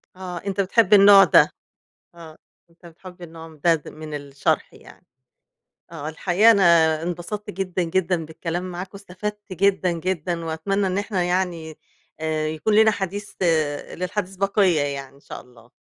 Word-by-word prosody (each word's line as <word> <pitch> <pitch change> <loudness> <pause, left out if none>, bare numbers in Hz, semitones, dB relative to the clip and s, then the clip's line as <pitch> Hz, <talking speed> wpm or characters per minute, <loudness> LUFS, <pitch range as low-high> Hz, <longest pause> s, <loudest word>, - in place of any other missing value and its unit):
آه، 180 -1 -7
أنت 195 +2 -2
بتحب 210 +1 +2
النوع 200 -1 +8
ده، 170 - +5 0.6
آه، 160 -2 -13 0.3
أنت 170 +1 -19
بتحب 180 +2 -14
النوع 165 -1 -11
ده 170 -1 +5
د 155 - -7
من 155 -1 -9
الشرح 140 -1 -2
يعني، - - -17 0.9
آه. 155 -2 -6
الحقيقة 190 +7 +3
أنا 200 -3 +3 0.4
انبسطت 180 +5 -5
جدًا، 185 -1 -3
جدًا 170 -1 -1
بالكلام 175 +3 -5
معاك، 185 +2 -7
واستفدت 200 +1 -7
جدًا، 190 -1 +1
جدًا، 170 -1 -3
وأتمنى 195 +5 -1
إن 185 +1 -2
إحنا 200 -3 -1
يعني 175 -3 -2 0.4
آآ، 155 -1 -2
يكون 155 +7 -1
لينا 220 +1 +5
حديث 200 +1 -5 0.6
للحديث 185 +1 -4
بقيّة 195 -4 +2
يعني، 140 -1 -5
إن - - -20
شاء - - -9
الله. 120 -2 -21
180 Hz, 150 wpm, -22 LUFS, 160-195 Hz, 0.9 s, النوع